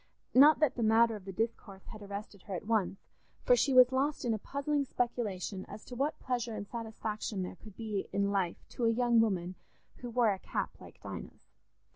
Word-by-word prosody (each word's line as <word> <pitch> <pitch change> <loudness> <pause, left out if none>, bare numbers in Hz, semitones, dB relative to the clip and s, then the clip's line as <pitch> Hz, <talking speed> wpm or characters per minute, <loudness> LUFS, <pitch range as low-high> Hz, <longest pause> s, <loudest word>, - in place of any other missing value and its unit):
Not 290 +4 +8
that 305 - +4
the 240 - -4
matter 225 +1 +4
of 200 -3 -10
the 195 - -5
discourse 200 -1 -4
had 215 - -10
arrested 200 -1 -7
her 190 - -2
at 175 - -6
once, 210 -4 +1 0.5
for - - +6
she 285 - +2
was 255 -1 +7
lost 275 +2 0
in 235 - +2
a 215 - -2
puzzling 280 +4 -1
speculation 215 -7 -2
as 215 - -10
to 250 - -8
what 285 +5 -1
pleasure 240 -3 -2
and 205 -1 -5
satisfaction 220 -3 -4
there 180 - -6
could 215 0 -13
be 215 -4 -3
in 200 0 +1
life 190 -4 -1
to 240 - -2
a - - +5
young 235 0 +3
woman 185 -5 0 0.4
who 245 - -7
wore 235 -3 +3
a 190 - -7
cap - - -3
like - - -13
Dinah's. - - -9
225 Hz, 205 wpm, -32 LUFS, 200-245 Hz, 0.5 s, Not